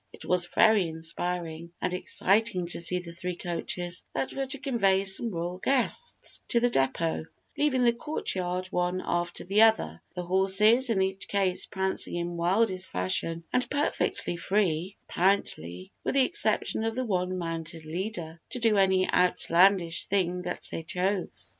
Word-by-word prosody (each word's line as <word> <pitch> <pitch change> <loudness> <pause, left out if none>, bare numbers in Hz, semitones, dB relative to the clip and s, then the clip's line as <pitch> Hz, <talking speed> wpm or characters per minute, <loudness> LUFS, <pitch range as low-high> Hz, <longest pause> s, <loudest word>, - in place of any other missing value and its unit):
It - - -12
was 180 -1 +2
very 215 -2 +4
inspiring 165 +1 -4
and 180 - -2
exciting 195 +1 +1
to - - 0
see 180 +2 +4
the 175 -1 -6
three 180 +1 -4
coaches, 175 0 -3
that - - -2
were 270 0 -3
to 280 +2 -1
convey 200 -8 +1
some 200 +4 +3
royal 175 -1 -4
guests 275 - -1
to 235 - +2
the 245 0 +1
depot, 160 - 0 0.3
leave 295 -1 +1
the 245 -2 +3
courtyard 185 - -3
one 180 +1 -1
after 175 0 -2
the 200 +4 +2
other, 85 - +3
the 180 - -4
horses 195 +7 +4
in 195 -4 +2
each 190 +1 -3
case 195 -3 0
prancing 190 -2 -2
in 175 0 -3
wildest 185 +2 0
fashion 130 - +1
and 250 - +1
perfectly 285 -10 -1
free, 185 -1 -1
apparently, 95 - 0
with - - -2
the 270 -2 +5
exception 255 - 0
of 225 0 -2
the 255 0 -2
one 185 -3 -1
mounted 165 -2 -4
leader, 170 -1 -5
to - - -2
do 225 -3 +2
any 190 -1 +3
outlandish 180 -1 +3
thing 180 -2 0
that 180 0 -3
they - - -4
chose. 180 +3 -2
185 Hz, 160 wpm, -27 LUFS, 170-210 Hz, 0.3 s, the